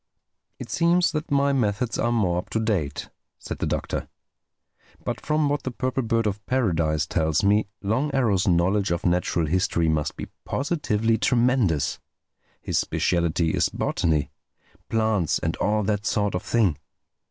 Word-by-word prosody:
"It - - -8
seems 170 +1 +3
that 155 -1 -4
my 140 0 +2
methods 115 -1 0
are 120 - +1
more 95 -7 +1
up - - -8
to 110 - -1
date," 100 -11 -2 0.3
said - - -7
the - - -1
Doctor. - - -3 1.0
"But - - -3
from 150 0 +1
what 145 0 0
the - - -3
Purple 130 +1 -2
Bird 115 -1 0
of 105 0 -2
Paradise 85 - +1
tells 80 0 0
me, 105 +1 +3 0.2
Long 120 +9 0
Arrow's 110 -8 +1
knowledge 95 +3 +2
of 85 0 -2
natural 85 -1 +1
history 85 0 +1
must 75 -1 -1
be - - -6
positively 115 -7 0
tremendous. 125 - +2 0.6
His - - 0
specialty 85 -2 0
is - - +1
botany—plants 90 +4 -2
and 80 +1 -2
all 105 +1 +1
that 105 -1 -1
sort 105 -1 0
of 90 - -1
thing. 100 -6 +1
105 Hz, 150 wpm, -24 LUFS, 85-125 Hz, 1.0 s, seems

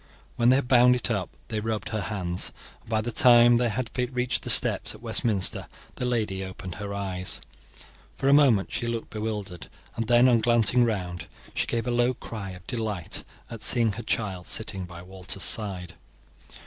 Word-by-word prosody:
When 120 +1 +3
they 130 - +6
had 135 -2 0
bound 125 -1 +5
it 125 0 -1
up 100 -5 -2 0.2
they 110 -2 -2
rubbed 110 0 -3
her 110 -2 -2
hands, 90 -4 -2 0.3
and - - -19
by 110 -1 +1
the 120 +2 -4
time 120 0 +6
they 120 0 +1
had 115 +2 -3
reached 125 0 -1
the - - -6
steps - - +4
at - - -15
Westminster 105 -6 +2 0.3
the 125 - -3
lady 110 -6 -1
opened 95 -1 -7
her 100 -1 -5
eyes. 95 -2 -2 0.8
For 135 - -2
a 140 - +5
moment 130 -9 +4
she 120 - -3
looked 115 -1 -4
bewildered, 105 -6 -5 0.3
and 115 -1 -3
then, 120 +1 +5
on 120 -2 +4
glancing 120 +1 +4
round, 90 -6 -3 0.3
she - - -1
gave 115 -1 -2
a 125 - -1
low 120 +1 +1
cry 105 -5 -7
of 90 -1 -11
delight 105 -7 -3 0.3
at 115 -2 -8
seeing 115 -1 +2
her 115 - -6
child 100 -5 -3
sitting 95 -4 -3
by 85 0 -11
Walter's 95 0 -2
side. 90 -2 -1
110 Hz, 185 wpm, -26 LUFS, 95-120 Hz, 0.8 s, they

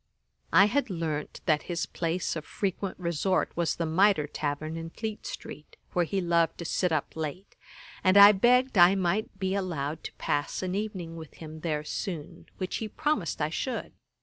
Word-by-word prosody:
I 185 +5 +7
had 260 +5 +1
learnt 160 -5 -3
that 155 -2 +3
his 170 -1 -1
place 170 +1 -2
of 155 - -4
frequent 195 +2 -3
resort 175 +2 0
was 170 -1 0
the 170 - -1
Mitre 165 0 +3
tavern 150 +1 -3
in 165 0 -5
Fleet 215 +4 -5
street, 150 - -9 0.2
where 175 -1 +2
he 195 +4 -1
loved 170 -2 +2
to 170 - -6
sit 180 +1 0
up 155 -3 -1
late, 160 +5 -5 0.5
and 185 +1 +5
I 200 +1 +11
begged 245 +2 +3
I 175 +3 +8
might 195 +2 -1
be 190 0 -1
allowed 160 -6 -2
to - - -6
pass 145 +5 -2
an 185 0 -2
evening 190 -5 -4
with 160 -2 -10
him 155 -1 -9
there 155 -2 -2
soon, 170 +1 -5
which 185 -1 -3
he 220 - -3
promised 215 - -1
I 150 - 0
should. 255 +10 -3
175 Hz, 180 wpm, -28 LUFS, 160-195 Hz, 0.5 s, I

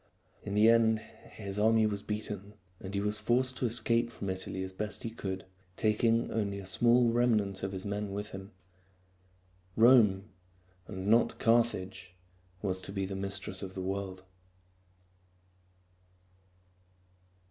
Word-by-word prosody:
In 100 -1 -5
the 105 +2 +6
end 115 -1 +5
his 105 -2 -8
army 110 +1 +4
was 100 -2 -1
beaten, 105 -1 -5 0.2
and 95 +1 -7
he - - +1
was 105 +1 -1
forced 125 +4 +2
to 125 - 0
escape 115 0 +1
from 100 -4 -4
Italy 95 0 -4
as 95 0 -6
best 105 +2 -3
he 115 - -4
could, 95 -4 -5 0.3
taking 115 +2 +2
only 100 -3 -1
a 100 - -7
small 120 +5 +3
remnant 110 -5 +1
of 95 - -3
his 95 0 -6
men 100 0 -3
with 105 +1 -5
him. 95 +1 -8 1.3
Rome 110 -5 +6 0.6
and 95 0 -6
not 115 +3 +3
Carthage 95 -6 0 0.5
was 95 -2 -1
to - - -5
be 95 -1 -2
the 95 0 -5
mistress 95 0 -4
of 95 -1 -7
the 95 - -4
world. 95 -1 -4
105 Hz, 140 wpm, -31 LUFS, 95-115 Hz, 1.3 s, the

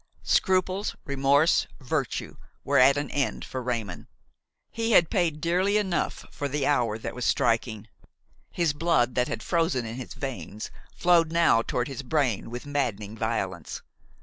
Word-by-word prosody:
'" - - -34 0.2
Scruples, 185 +1 0
remorse, 140 +3 +3
virtue 135 0 -3 0.3
were 140 0 +3
at 135 +2 +6
an 145 -1 -3
end 140 -2 -1
for 130 - -5
Raymon; 115 -7 -4 0.6
he 230 0 -1
had 170 -5 +5
paid 165 -5 +1
dearly 185 +6 +2
enough 190 -4 -1
for 145 - -3
the 140 0 -1
hour 120 -7 +1
that 110 - -6
was 125 - -5
striking. 115 -2 0 0.6
His 170 -4 0
blood 145 -5 +2
that 125 0 +1
had - - -4
frozen 165 -8 0
in 115 +2 -6
his 130 - -7
veins 110 - -6 0.2
flowed 170 -2 +3
now 165 -9 +4
toward 125 +1 -2
his 135 -1 -5
brain 130 -6 0
with 120 +3 -7
maddening 115 -8 -2
violence. 100 -7 -3
140 Hz, 155 wpm, -26 LUFS, 120-165 Hz, 0.6 s, at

